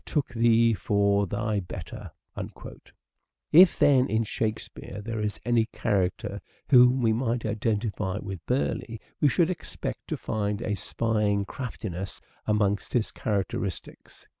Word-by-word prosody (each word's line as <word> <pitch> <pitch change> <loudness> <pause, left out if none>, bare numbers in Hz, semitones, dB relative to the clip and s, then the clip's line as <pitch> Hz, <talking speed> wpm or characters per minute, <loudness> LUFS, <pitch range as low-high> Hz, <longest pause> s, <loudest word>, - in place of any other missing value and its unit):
took 150 -4 -1
thee 115 -1 +4
for 100 -1 +2
thy 105 +2 -1
better." 90 -1 -7 1.4
If, 175 +3 +8
then, 130 -3 +4
in 110 +1 +1
Shakespeare 110 -2 -4
there 110 +1 -4
is 105 -1 -2
any 120 -2 +2
character 100 -1 -1 0.3
whom 125 0 +6
we 110 -1 +4
might 115 0 -1
identify 105 -2 -1
with 95 -5 -6
Burleigh 125 -2 -1 0.2
we 150 - +4
should 170 +4 +3
expect 180 - -6
to - - -2
find 105 0 -2
a 105 - -1
spying 105 0 0
craftiness 100 -7 -6 0.3
amongst 105 -2 +1
his 120 -3 +1
characteristics. 100 -2 -4
110 Hz, 125 wpm, -27 LUFS, 100-115 Hz, 1.4 s, If